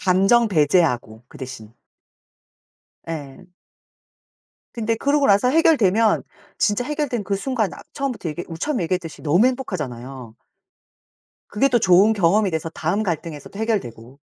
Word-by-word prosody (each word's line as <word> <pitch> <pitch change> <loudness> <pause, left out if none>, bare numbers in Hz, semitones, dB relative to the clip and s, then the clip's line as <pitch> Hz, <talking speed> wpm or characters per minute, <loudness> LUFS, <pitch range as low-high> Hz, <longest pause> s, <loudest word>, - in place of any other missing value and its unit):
감정 195 +5 +3
배제하고, 145 - +1
그 - - -14
대신. 115 -5 -9 1.3
예. 155 +1 -8 1.3
근데 230 -1 -1
그러고 280 +4 +1
나서 200 +4 +4
해결되면 230 - +3 0.4
진짜 210 +3 +1
해결된 285 -6 -2
그 200 0 -1
순간 220 -2 -1
아 - - -12
처음부터 265 - -3
얘기 175 +3 -5
우리 165 -2 -8
처음에 260 - -1
얘기했듯이 165 -2 -4
너무 175 +10 +3
행복하잖아요. 135 - -5 1.1
그게 240 +7 +2
또 245 -2 +3
좋은 190 +2 +5
경험이 200 0 +2
돼서 160 -1 -3
다음 170 +7 -1
갈등에서 165 -5 -4
해결되고. 140 - -4
190 Hz, 310 characters per minute, -21 LUFS, 155-230 Hz, 1.3 s, 좋은